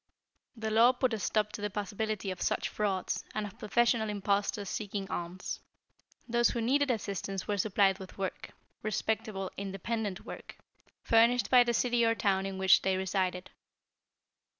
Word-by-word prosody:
The 220 -1 -3
law 230 +3 +6
put 250 -1 0
a 220 - -2
stop 210 0 0
to 215 - -7
the 210 - -1
possibility 205 0 -3
of 185 - -7
such - - 0
frauds, 195 -3 -1
and 215 -1 -1
of 200 - -10
professional 235 0 +2
impostors 200 0 0
seeking 200 -1 -4
alms. 175 +2 -4 0.7
Those 240 0 +3
who 235 - -2
needed 275 +5 +2
assistance 195 -4 -3
were 205 -1 -1
supplied 195 -1 +3
with 190 -1 -10
work 195 -1 -4 0.3
respectable, 215 -2 -2
independent 200 +1 -3
work - - -9 0.5
furnished 235 +2 +4
by 250 -1 +8
the 240 -1 0
city 240 0 +2
or 230 0 +3
town 195 -3 +1
in 195 -1 -5
which 190 0 +5
they 190 0 +1
resided. 185 -1 -1
210 Hz, 155 wpm, -31 LUFS, 195-225 Hz, 0.7 s, by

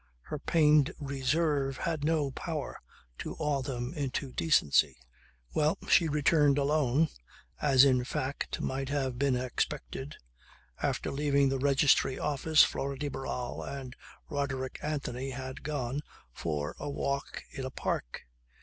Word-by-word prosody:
Her 150 - -5
pained 150 -2 +4
reserve 140 0 0
had 160 -3 -2
no 150 -3 +1
power 155 +1 -5 0.4
to - - -5
awe 145 -2 0
them 125 -1 -4
into 140 -3 -3
decency. 135 - +3 0.6
Well, 155 +1 +2
she 165 - +5
returned 145 -1 +3
alone 145 +1 +2 0.5
as 135 -2 +6
in 130 -2 +3
fact 135 +1 -3
might 135 0 -2
have 135 -4 -1
been 140 -2 +2
expected. 130 - -3 0.7
After - - -1
leaving 140 -1 +2
the 135 0 -1
Registry 135 -1 +3
Office 150 +1 +4
Flora 140 0 -1
de 145 +1 -2
Barral 130 -2 -4
and 135 -2 -6 0.3
Roderick 135 -3 -3
Anthony 135 -3 -3
had 130 0 -6
gone 140 -2 -2 0.3
for 75 -3 -3
a 145 - -4
walk 140 0 -3
in 135 - -5
a 130 - -3
park. - - -3
140 Hz, 130 wpm, -30 LUFS, 130-150 Hz, 0.7 s, as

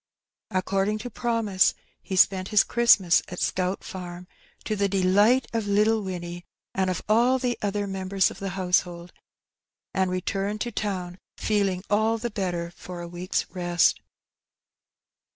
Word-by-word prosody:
According 195 +3 0
to 245 - -5
promise 225 -5 +1 0.3
he 190 - -5
spent 185 0 +4
his 210 -1 +4
Christmas 215 -7 +4
at 180 - -7
Scout 185 +1 -1
Farm, 180 -1 -7 0.4
to 215 - -2
the 200 -1 +1
delight 200 +6 +3
of 225 -2 -1
little 215 +2 +3
Winnie 175 -2 -6 0.3
and 190 -1 0
of 180 - -3
all 240 +5 +4
the 250 -2 -1
other 205 0 -1
members 190 0 0
of - - -11
the 195 - -3
household, 180 -1 0 0.8
and 190 -1 +1
returned 195 +3 -2
to 240 - -2
town 185 -4 -4 0.2
feeling 195 -4 0
all 220 +2 +2
the 235 +1 -4
better 175 -4 -3
for 175 0 -9
a - - -6
week^s 175 +2 -2
rest. 175 -2 +2
195 Hz, 145 wpm, -25 LUFS, 180-210 Hz, 0.8 s, spent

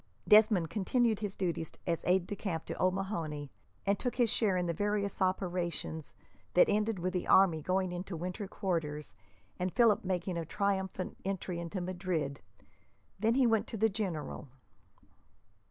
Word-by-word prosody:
Desmond 210 -5 +6
continued 225 +1 +1
his 205 -2 -4
duties 170 -4 -2
as 170 -2 -1
aide 180 0 +3
de 205 - -4
camp 170 -6 -3
to - - -5
O'Mahony, 170 -6 -1 0.3
and 200 0 +2
took 245 - -2
his 240 -3 +3
share 200 -5 +2
in 180 - 0
the 170 - 0
various 205 +2 -1
operations, 175 -4 -1 0.4
that 180 - +7
ended 210 0 +1
with 180 +1 -2
the 180 - -2
army 175 -5 +5
going 185 +3 0
into 180 0 -5
winter 185 +4 -4
quarters 160 -7 -3 0.5
and 180 +1 0
Philip 230 -2 +4
making 180 -1 -1
a - - -2
triumphant 190 +1 -2
entry 185 -2 -3
into 170 +2 -4
Madrid. 175 -6 -2 0.8
Then 225 +3 +2
he 265 -1 +4
went 225 -2 +2
to 225 - -5
the 225 +2 +3
general. 190 -9 -4
185 Hz, 155 wpm, -32 LUFS, 170-205 Hz, 0.8 s, that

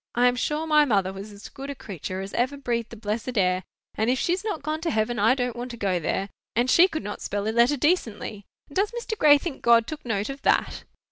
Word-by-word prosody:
I 245 +1 +4
am 245 - +2
sure 300 +5 -1
my 300 -1 +5
mother 195 -8 +1
was 200 +2 -8
as 200 0 -11
good 275 +1 -9
a 280 - -4
creature 190 - -6
as 195 +1 -7
ever 260 +4 0
breathed 235 -4 -2
the - - -9
blessed 225 +3 -3
air; 185 -1 +2 0.3
and 220 +2 0
if 255 - +2
she's 360 +7 0
not 415 -10 -3
gone 310 +1 -2
to 335 - -1
heaven 220 -1 0
I 225 +5 +4
don't 245 -2 -2
want 245 +1 -5
to 240 - -8
go 195 -5 0
there; 195 +4 -2 0.3
and 245 +3 +2
she 350 +2 +7
could 315 -4 -5
not 205 - -6
spell 205 +1 -2
a - - +1
letter 240 +5 +4
decently. 225 - -1 0.2
And 280 - -16
does 400 +2 +2
Mr. 475 -1 -4
Gray 300 -7 +6
think 285 -1 -6
God 235 -1 +5
took 310 +3 -7
note 220 -2 -2
of 275 +1 -9
that?" - - +1
240 Hz, 255 wpm, -25 LUFS, 210-290 Hz, 0.3 s, she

